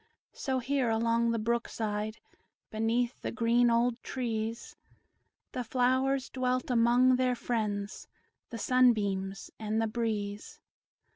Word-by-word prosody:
So 265 Hz, -2 st, -2 dB
here, 260 Hz, 0 st, 0 dB
along 230 Hz, +1 st, +2 dB
the 230 Hz, -, +1 dB
brook 235 Hz, +2 st, 0 dB
side, 215 Hz, 0 st, -3 dB, 0.5 s
Beneath 230 Hz, +3 st, 0 dB
the -, -, -3 dB
green 240 Hz, 0 st, +3 dB
old 235 Hz, +1 st, +1 dB
trees, 230 Hz, -3 st, -4 dB, 0.8 s
The 250 Hz, -, -3 dB
flowers 260 Hz, +2 st, +1 dB
dwelt 255 Hz, 0 st, -1 dB
among 245 Hz, +2 st, +4 dB
their 255 Hz, -1 st, +1 dB
friends, 210 Hz, -4 st, -3 dB, 0.4 s
The 230 Hz, -, -6 dB
sunbeams 205 Hz, -6 st, +1 dB
and 215 Hz, 0 st, -1 dB
the 225 Hz, -, +2 dB
breeze. 215 Hz, -2 st, -3 dB
235 Hz, 120 wpm, -30 LUFS, 220-250 Hz, 0.8 s, among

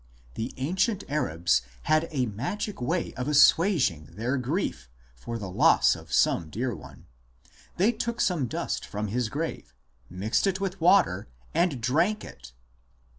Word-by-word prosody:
The 110 Hz, -, -4 dB
ancient 190 Hz, -, 0 dB
Arabs 85 Hz, -, +1 dB, 0.2 s
had 155 Hz, +2 st, +2 dB
a 135 Hz, -6 st, 0 dB
magic 140 Hz, -, -4 dB
way 165 Hz, +8 st, -1 dB
of 130 Hz, +1 st, -4 dB
assuaging 150 Hz, -, +4 dB
their 120 Hz, +5 st, -1 dB
grief 130 Hz, -, -2 dB, 0.3 s
for 115 Hz, -, -6 dB
the 105 Hz, -3 st, -6 dB
loss -, -, +4 dB
of -, -, -12 dB
some 80 Hz, -, +2 dB
dear 120 Hz, +8 st, -2 dB
one; 75 Hz, -, -13 dB, 0.7 s
they 200 Hz, +6 st, +4 dB
took 235 Hz, +1 st, -4 dB
some 165 Hz, -, +1 dB
dust -, -, -3 dB
from 105 Hz, 0 st, -4 dB
his 120 Hz, +1 st, -1 dB
grave, 145 Hz, -, -5 dB, 0.3 s
mixed 105 Hz, -, 0 dB
it 190 Hz, -1 st, 0 dB
with 195 Hz, -2 st, -4 dB
water, 130 Hz, -, +4 dB, 0.3 s
and 165 Hz, -5 st, +1 dB
drank 165 Hz, -, +1 dB
it -, -, -12 dB
135 Hz, 145 wpm, -27 LUFS, 110-180 Hz, 0.7 s, assuaging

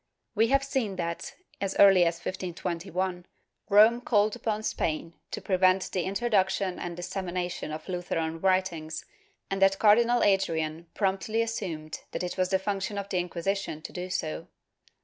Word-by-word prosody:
We 225 Hz, +1 st, +3 dB
have 275 Hz, +2 st, +3 dB
seen 255 Hz, -8 st, -1 dB
that, 170 Hz, -2 st, -4 dB, 0.3 s
as 195 Hz, -1 st, -1 dB
early 195 Hz, -3 st, +7 dB
as 170 Hz, 0 st, +1 dB
1521, 180 Hz, 0 st, -4 dB, 0.4 s
Rome 220 Hz, +4 st, +6 dB
called 210 Hz, -3 st, +2 dB
upon 215 Hz, -1 st, -2 dB
Spain 165 Hz, -4 st, -2 dB, 0.2 s
to -, -, -6 dB
prevent 185 Hz, 0 st, +2 dB
the 180 Hz, -3 st, -1 dB
introduction 195 Hz, -3 st, +1 dB
and 175 Hz, -1 st, -5 dB
dissemi 180 Hz, +1 st, -4 dB
nation 175 Hz, -3 st, -3 dB
of 155 Hz, 0 st, -7 dB
Lutheran 165 Hz, -3 st, -2 dB
writings, 175 Hz, -4 st, 0 dB, 0.5 s
and 195 Hz, 0 st, -1 dB
that 195 Hz, 0 st, +5 dB
Cardinal 235 Hz, +4 st, +5 dB
Adrian 165 Hz, -4 st, +1 dB
promptly 210 Hz, +3 st, 0 dB
assumed 170 Hz, -9 st, -4 dB
that -, -, -2 dB
it 180 Hz, -, -3 dB
was 185 Hz, -1 st, 0 dB
the 190 Hz, -, +3 dB
function 200 Hz, +1 st, -3 dB
of 200 Hz, 0 st, -4 dB
the 185 Hz, -, 0 dB
Inquisition 175 Hz, -2 st, -3 dB
to -, -, -8 dB
do 180 Hz, 0 st, -5 dB
so. 75 Hz, -, -3 dB
190 Hz, 155 wpm, -28 LUFS, 175-200 Hz, 0.5 s, early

